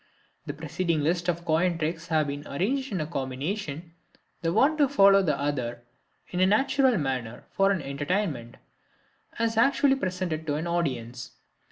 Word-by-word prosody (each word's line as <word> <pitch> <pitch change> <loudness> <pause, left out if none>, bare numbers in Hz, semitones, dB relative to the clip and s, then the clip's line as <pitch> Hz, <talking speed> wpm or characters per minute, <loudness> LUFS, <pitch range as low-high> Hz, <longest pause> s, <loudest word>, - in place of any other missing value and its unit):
The 145 - -3
preceding 160 +2 -1
list 170 +4 0
of 170 0 -2
coin 170 +2 +2
tricks 165 +1 -3
has 160 -2 +2
been 145 +1 -5
arranged 260 - -1
in 175 -6 -1
combination, 155 +4 -4 0.5
the 165 - 0
one 280 - +3
to 290 -3 +3
follow 195 -7 +6
the 165 -6 0
other 125 -5 -2 0.5
in 180 - -2
a 185 - +5
natural 260 +3 +3
manner, 130 -6 -3
for 195 0 +3
an 190 -6 0
entertainment, 140 - -2 0.8
as 230 -1 0
actually 275 +3 +4
presented 185 -9 -3
to 145 - 0
an 155 +3 -3
audience. 130 -8 -3
165 Hz, 155 wpm, -27 LUFS, 145-195 Hz, 0.8 s, follow